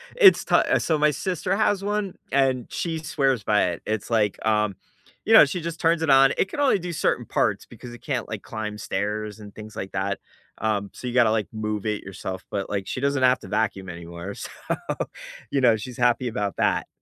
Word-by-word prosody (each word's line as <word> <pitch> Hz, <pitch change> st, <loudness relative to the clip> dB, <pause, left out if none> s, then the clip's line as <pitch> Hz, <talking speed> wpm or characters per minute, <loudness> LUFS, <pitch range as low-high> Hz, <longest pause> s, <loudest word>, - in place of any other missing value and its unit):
It's 410 Hz, -6 st, +7 dB
to -, -, +3 dB
Uh, -, -, +3 dB
so 160 Hz, -, +1 dB
my 150 Hz, 0 st, +4 dB
sister 180 Hz, +5 st, -1 dB
has 205 Hz, -1 st, +1 dB
one, 205 Hz, -1 st, -2 dB, 0.2 s
and 130 Hz, -3 st, +2 dB
she 165 Hz, -2 st, -2 dB
swears 135 Hz, -7 st, 0 dB
by 105 Hz, -3 st, +3 dB
it. 85 Hz, -, -7 dB
It's 110 Hz, 0 st, -2 dB
like, 105 Hz, -3 st, +1 dB
um, 105 Hz, -2 st, +2 dB, 0.5 s
you -, -, +3 dB
know, -, -, +10 dB
she 170 Hz, +5 st, -4 dB
just 165 Hz, 0 st, -5 dB
turns 165 Hz, 0 st, +2 dB
it 160 Hz, -, 0 dB
on. 135 Hz, 0 st, +6 dB
It 190 Hz, -, +1 dB
can 290 Hz, -, -6 dB
only 270 Hz, -8 st, +3 dB
do 175 Hz, 0 st, -5 dB
certain -, -, 0 dB
parts -, -, 0 dB
because 120 Hz, -1 st, -11 dB
it 120 Hz, -, -11 dB
can't, 130 Hz, -6 st, -3 dB
like, 110 Hz, -2 st, -5 dB
climb 105 Hz, -1 st, -5 dB
stairs 105 Hz, +1 st, -3 dB
and 105 Hz, -1 st, -12 dB
things 110 Hz, 0 st, -10 dB
like 95 Hz, -, -6 dB
that, 95 Hz, +1 st, -1 dB, 0.4 s
um, 105 Hz, -2 st, -1 dB
so 125 Hz, -, -7 dB
you 120 Hz, -, -3 dB
gotta, 120 Hz, -3 st, +5 dB
like, 110 Hz, -3 st, 0 dB
move 105 Hz, -1 st, -3 dB
it 105 Hz, -1 st, -2 dB
yourself, 95 Hz, -1 st, -6 dB
but, 100 Hz, -1 st, -3 dB
like, 100 Hz, -2 st, -2 dB
she -, -, -3 dB
doesn't 140 Hz, -2 st, +1 dB
have 125 Hz, 0 st, +5 dB
to -, -, -11 dB
vacuum 100 Hz, -3 st, -1 dB
anymore, 85 Hz, +2 st, -7 dB
so, -, -, -7 dB, 1.0 s
you 140 Hz, -, +1 dB
know, 115 Hz, -3 st, +5 dB
she's 120 Hz, +3 st, -8 dB
happy 125 Hz, 0 st, +2 dB
about 105 Hz, -3 st, -2 dB
that. -, -, +1 dB
115 Hz, 220 wpm, -24 LUFS, 105-145 Hz, 1.0 s, know